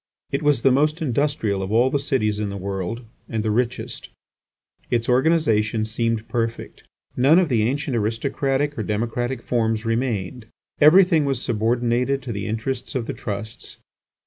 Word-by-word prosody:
It 140 - -1
was 145 -5 +2
the 135 - +5
most 150 +5 +2
industrial 135 - 0
of 95 +1 -4
all 120 +4 +3
the 145 - +1
cities 115 -7 0
in 105 -1 -2
the 100 - -5
world 100 +5 -4 0.2
and 110 -2 -2
the 110 - 0
richest. 125 +3 -2 0.8
Its 120 -1 0
organisation 125 -6 +2
seemed 115 0 -1
perfect. 115 -1 -3 0.3
None 140 +6 +5
of 180 -3 +3
the 120 -4 +2
ancient 135 +4 -1
aristocratic 135 +5 -1
or - - 0
democratic 115 +4 -2
forms 115 -2 0
remained; 115 -2 -2 0.3
everything 165 +1 +6
was 135 -3 0
subordinated 120 +3 0
to 120 - -5
the 100 -2 -4
interests 120 +5 -3
of 125 -3 -1
the - - -4
trusts. 110 +2 -7
120 Hz, 155 wpm, -22 LUFS, 110-135 Hz, 0.8 s, everything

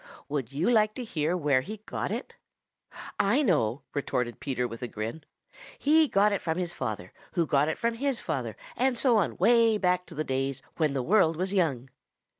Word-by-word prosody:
"Would 140 -5 -3
you 145 +6 -1
like 215 -2 +3
to 255 - -4
hear 165 -5 -1
where 145 -5 +2
he 215 +10 -7
got - - -3
it?" - - -5 0.8
"I 235 +9 +3
know," 140 - +1
retorted 125 -4 -2
Peter 125 -3 -2
with 115 -1 -9
a 125 - -3
grin. 115 +8 -5 0.5
"He 310 +2 +4
got 205 -2 +3
it 200 - -1
from 160 0 -2
his 175 -1 -2
father, 105 - -5 0.2
who 170 - +2
got 145 0 +2
it 160 - -2
from 235 0 0
his 270 +1 -1
father, - - -3 0.2
and 260 -1 +1
so 240 -2 +4
on 200 - 0
way 230 -2 +4
back 180 -2 +1
to 165 - -11
the 155 - -1
days 135 0 -2
when 155 -4 +1
the 135 -2 -1
world 170 - +4
was 185 +3 -2
young." 135 -9 0
165 Hz, 200 wpm, -28 LUFS, 135-215 Hz, 0.8 s, He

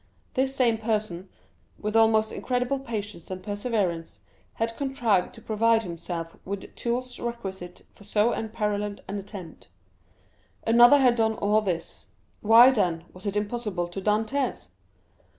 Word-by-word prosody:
This 265 +1 0
same 235 -4 +2
person, 210 -5 -2 0.5
with 210 +1 -4
almost 220 -1 +4
incredible 250 +2 -1
patience 210 -8 -6
and 185 -1 -6
perseverance, 205 -5 -2 0.3
had 230 0 -2
contrived 240 -9 0
to - - -14
provide 225 +1 +2
himself 170 -2 -6
with 200 0 -6
tools 245 +1 -3
requisite 195 -7 -6
for - - -18
so 210 +3 +2
unparalleled 210 -2 -3
an 200 - -3
attempt. 195 -4 -10 1.0
Another 240 +4 +7
had 255 -3 +5
done 220 -2 +1
all 210 +1 +2
this; 180 -5 -4 0.3
why, 230 +4 +8
then, 175 -8 0
was 185 +3 -8
it 200 - -2
impossible 210 -4 -2
to 195 +3 -6
Dantès? 220 +7 -1
215 Hz, 135 wpm, -26 LUFS, 195-235 Hz, 1.0 s, why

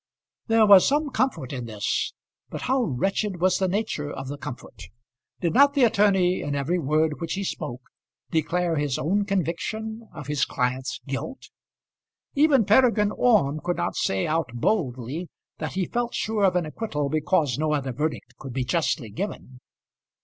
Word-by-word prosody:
There 225 -1 +5
was 200 -3 +8
some 290 +1 +1
comfort 255 - -1
in 125 -3 -4
this; 110 -3 -1 0.4
but - - -6
how 260 +1 +1
wretched 195 - -1
was 185 +1 +2
the 190 - +2
nature 180 -7 -2
of 135 - -6
the 145 - -5
comfort! 125 - -8 0.6
Did 170 -3 0
not 280 +4 +5
the 275 - +4
attorney, 195 -5 +3
in 145 0 -3
every 150 +6 0
word 155 +1 +1
which 165 -1 -2
he 200 - -3
spoke, 125 -8 -5 0.5
declare 165 +1 0
his 145 -3 0
own 200 +8 0
conviction 215 +4 -3
of - - -9
his 145 -1 0
client's 125 +1 -1
guilt. 140 - -5 0.8
Even 280 -6 +4
Peregrine 215 -1 +4
Orme 195 - +3
could 175 - -1
not - - -2
say 95 -1 0
out 160 -2 0
boldly 135 - -1 0.3
that - - -4
he 190 -1 0
felt 240 +3 -2
sure 215 -2 +1
of 185 - +2
an 175 -2 +1
acquittal 155 -4 -3
because 150 -3 +1
no 155 0 +1
other 135 -3 -1
verdict 150 -2 -3
could 135 -2 -8
be 130 0 -1
justly 140 -5 -1
given. 150 - -6
170 Hz, 165 wpm, -25 LUFS, 140-210 Hz, 0.8 s, was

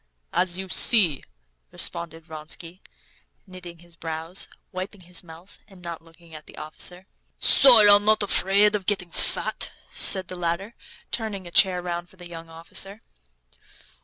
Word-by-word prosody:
"As 180 -1 -1
you 190 0 -7
see," 185 - +3 0.5
responded 165 -1 -3
Vronsky, 165 +3 -11 0.6
knitting 180 -3 -13
his 170 0 -19
brows, 165 +3 -3 0.2
wiping 185 +1 -8
his 180 0 -4
mouth, 170 +3 -16
and 195 -3 -18
not 170 -2 -9
looking 165 0 -21
at 155 -1 -12
the - - -16
officer. 175 +4 -4 0.3
"So 250 -5 +7
you're 205 -1 +6
not 215 +1 +1
afraid 200 +1 +2
of 200 -3 -4
getting 185 -4 -2
fat?" - - 0 0.2
said 190 -2 +6
the 185 - -8
latter, 175 +5 -4 0.4
turning 210 -5 -5
a 175 - -11
chair 185 -1 +3
round 175 0 -6
for - - -21
the 180 -1 -13
young 165 -1 -11
officer. 195 +6 -6
180 Hz, 150 wpm, -23 LUFS, 170-195 Hz, 0.6 s, So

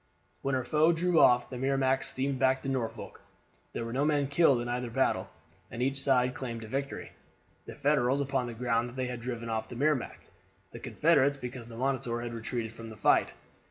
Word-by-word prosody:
When 135 -1 0
her 130 - 0
foe 155 +6 +3
drew 170 0 +2
off 125 0 +5
the 125 - -5
Merrimac 135 0 +1
steamed 135 0 -2
back 130 0 +2
to - - -4
Norfolk. 125 -4 -4 0.5
There 115 - -3
were 115 - -5
no 135 +3 +1
men 145 -2 +2
killed 140 -2 +4
in 120 - -4
either 125 0 -2
battle, 115 - 0 0.4
and 120 - -3
each 135 +1 0
side 125 -2 +2
claimed 115 -4 -5
a - - -8
victory; 135 +4 -4 0.6
the - - -8
Federals 140 -2 +2
upon 135 -3 -1
the 120 - -6
ground 120 0 0
that 120 - -12
they 130 -1 -1
had 125 -1 -4
driven 120 -1 -5
off 110 -1 -3
the 125 - -8
Merrimac, 145 0 0 0.5
the - - -9
Confederates 145 -3 +2
because 125 -2 -7
the 115 -1 -10
Monitor 130 -2 -1
had 120 0 -5
retreated 115 -1 -4
from 115 0 -9
the 110 - -10
fight. - - +3
130 Hz, 205 wpm, -30 LUFS, 120-135 Hz, 0.6 s, off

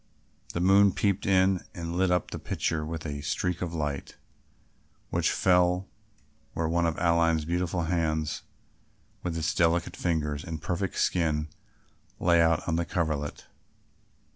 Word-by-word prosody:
The - - -2
moon 95 +1 +5
peeped 100 0 0
in 95 -1 +3
and 85 -1 -4
lit 95 +1 +2
up 90 -1 0
the - - -5
picture 80 -1 -2
with 80 +1 -5
a 70 -2 -4
streak 90 +4 -2
of 90 -2 -2
light, 75 -4 -3 1.0
which - - +2
fell 90 0 +3 0.7
where 80 - -1
one 85 +1 +1
of 80 - -2
Aline's 85 -2 +2
beautiful 85 +1 -1
hands 80 -2 -1 0.8
with 85 -2 -3
its 80 0 0
delicate 85 0 +1
fingers 75 -4 -1
and 80 -1 -5
perfect 90 +4 -2
skin 80 -3 +1 0.7
lay 85 -1 +4
out 80 -1 +2
on 80 -1 +1
the 85 - 0
coverlet. 75 -5 -2
85 Hz, 140 wpm, -28 LUFS, 80-90 Hz, 1.0 s, moon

